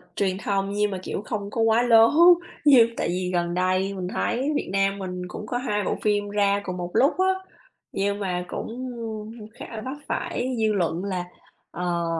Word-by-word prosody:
truyền 190 -2 0
thông 195 -1 0
nhiên 205 0 0
mà, 190 - -3
kiểu, - - -4
không 205 -3 -4
có 230 - -1
quá 225 +1 +4
lố. 230 -2 +6 0.6
Như 250 -6 +7
tại - - 0
vì 180 +1 -2
gần 175 -1 0
đây 185 +2 +1
mình 185 -2 -4
thấy 265 +4 0
Việt - - -2
Nam 195 0 +1
mình 180 -1 -5
cũng 210 - -7
có 245 - -1
2 210 -5 -1
bộ - - 0
phim 205 -1 +1
ra 200 -1 +2
cùng 185 -2 -5
một 175 0 -5
lúc 275 - +4
á, 375 0 +4 0.6
nhưng 200 +1 -1
mà 180 -3 -2
cũng 250 +7 -5 0.7
khá - - -6
là 215 - -5
vấp 265 +3 -5
phải 255 +1 -2
dư 220 -1 +2
luận 175 -2 -1
là, 185 -3 -2 0.5
ờ, 175 -1 -2
200 Hz, 195 wpm, -24 LUFS, 185-225 Hz, 0.7 s, Như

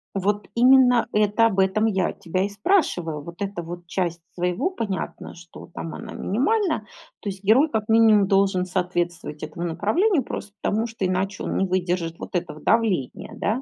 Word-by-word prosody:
Вот 205 +2 -1
именно 250 0 +5
это, 210 +2 +3
об 205 -4 +1
этом 190 +3 +2
я 190 -5 +1
тебя 185 +2 -2
и 200 - -1
спрашиваю. 200 - 0
Вот 170 +4 -11
эта 195 -3 -3
вот 175 +1 -8
часть 170 -1 -2
своего 180 - -1
понятно, 215 - -5
что 170 0 -13
там 165 - -6
она 225 -1 -8
минимальна. 310 - 0 0.4
То 205 - -3
есть 190 0 -8
герой, 245 +10 +5
как 220 -5 -2
минимум, 220 -3 +5
должен 195 -2 +2
соответствовать 175 -4 -2
этому 155 +3 -5
направлению, 270 - +1
просто 205 - -6
потому 220 +2 0
что 225 -4 -4
иначе 185 +2 -1
он - - -3
не 195 - +2
выдержит 180 -2 -1
вот - - -8
этого 170 -3 -3
давления, 195 - 0
да. 220 +5 -1
195 Hz, 170 wpm, -23 LUFS, 175-225 Hz, 0.4 s, именно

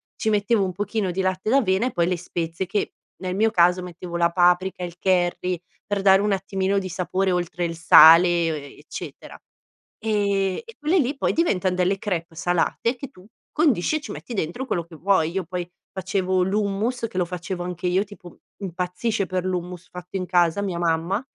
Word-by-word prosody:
ci 220 - -1
mettevo 210 +1 +2
un 185 - -2
pochino 205 +1 -2
di 190 - -1
latte 185 +2 -1
d'avena 235 -4 +3
e - - -3
poi 170 -5 +1
le 180 0 0
spezie 170 0 -4
che 205 - -2 0.3
nel 185 -1 -3
mio 220 +3 +3
caso 180 -2 +4
mettevo 175 0 -6
la 170 0 +3
paprika, 180 +1 +2
il 175 0 -6
curry 180 -1 +1 0.3
per 205 -1 -1
dare 195 0 +6
un 205 0 +1
attimino 195 0 -1
di 190 -1 -5
sapore 185 +2 -1
oltre 175 0 -1
il 165 -1 -4
sale 165 +1 +8
e 170 -1 +1
o - - -2
e 145 -2 -9
eccetera, - - -9 0.6
ehm, 200 -3 0
e 460 -1 -13
quelle 315 +5 +2
lì 275 +1 0
poi - - 0
diventan 190 - +1
delle 185 +2 +1
crêpes 170 -5 -4
salate 175 +8 0
che 265 +3 -7
tu 185 - -18 0.3
condisci 295 - +2
e - - -7
ci 285 - -8
metti 245 - -8
dentro 185 +8 -3
quello 185 -9 -1
che 170 -1 -14
vuoi. 165 -1 +2
Io 190 0 -2
poi 180 0 -4 0.2
facevo 190 -1 0
l'hummus 210 +5 -1
che 185 - -8
lo 180 - +2
facevo 180 +1 -5
anche 180 0 -4
io, 185 +2 +2
tipo 195 -4 -14 0.2
impazzisce 185 +3 -2
per 185 0 -2
l'hummus 180 -1 -4
fatto 180 +1 -7
in 185 - -3
casa 175 +1 +2
mia 190 -4 -2
mamma, 170 +4 0
185 Hz, 195 wpm, -23 LUFS, 175-200 Hz, 0.6 s, sale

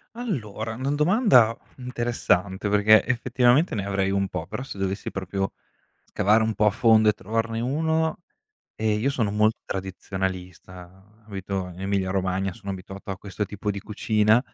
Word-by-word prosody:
Allora, 115 - -4
una 130 +4 -2
domanda 150 - +4 0.2
interessante, 120 -6 -1
perché 105 0 +5
effettivamente 125 +5 +2
ne 100 -2 -2
avrei 95 -1 0
un 100 0 +1
po', 90 -3 -5
però 95 - -6
se 135 -6 -8
dovessi 95 +1 -2
proprio 95 0 -3 0.5
scavare 110 +3 +2
un 110 0 0
po' 105 - +1
a - - +6
fondo 110 +1 +4
e 105 - +5
trovarne 115 +3 -2
1, 160 +5 0 0.6
ehm, 110 -1 0
io 140 +5 +1
sono 110 -7 -1
mol 105 +1 +4
tradizionalista, 95 +1 -6
abito 95 -2 -4
in 90 - -11
Emilia 95 -1 -1
Romagna, 95 0 -1
sono 100 -3 -8
abituato 95 +1 -7
a 95 - -3
questo 105 +1 -4
tipo 105 +1 -3
di 100 - -6
cucina, 105 +2 +2
105 Hz, 155 wpm, -25 LUFS, 95-115 Hz, 0.6 s, a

